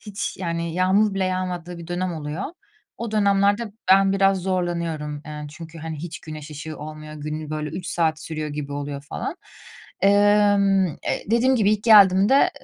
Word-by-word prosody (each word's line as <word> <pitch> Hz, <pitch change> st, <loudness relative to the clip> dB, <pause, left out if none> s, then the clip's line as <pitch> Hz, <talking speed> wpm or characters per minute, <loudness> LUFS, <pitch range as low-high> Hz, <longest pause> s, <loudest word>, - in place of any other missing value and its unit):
hiç, 205 Hz, -1 st, -5 dB
yani, 170 Hz, -2 st, -3 dB
yağmur 195 Hz, +3 st, +3 dB
bile 195 Hz, -1 st, 0 dB
yağmadığı 180 Hz, -2 st, -3 dB
bir 170 Hz, -, -9 dB
dönem 175 Hz, +1 st, -2 dB
oluyor. 155 Hz, +4 st, -4 dB, 0.5 s
O 235 Hz, -1 st, -5 dB
dönemlerde 205 Hz, +1 st, +2 dB, 0.2 s
ben 195 Hz, 0 st, +5 dB
biraz 195 Hz, 0 st, +3 dB
zorlanıyorum, 170 Hz, -5 st, -2 dB
eee, 150 Hz, -1 st, -6 dB
çünkü, 165 Hz, +2 st, -10 dB
hani, 160 Hz, 0 st, -5 dB
hiç 170 Hz, +1 st, -7 dB
güneş 155 Hz, -1 st, -9 dB
ışığı 155 Hz, +1 st, -7 dB
olmuyor, 155 Hz, 0 st, -8 dB
günün 155 Hz, 0 st, -5 dB
böyle 155 Hz, 0 st, -3 dB
3 180 Hz, -, -6 dB
saat 160 Hz, -2 st, 0 dB
sürüyor 155 Hz, -1 st, -4 dB
gibi 145 Hz, -1 st, -5 dB
oluyor 145 Hz, 0 st, -5 dB
falan. 145 Hz, -, -5 dB, 0.6 s
Emm, 200 Hz, -1 st, +4 dB
eee, 160 Hz, -, -4 dB
dediğim 250 Hz, +3 st, +3 dB
gibi 210 Hz, -3 st, +3 dB
ilk 210 Hz, -1 st, -1 dB
geldiğimde, 205 Hz, +3 st, +6 dB
175 Hz, 160 wpm, -23 LUFS, 155-200 Hz, 0.6 s, geldiğimde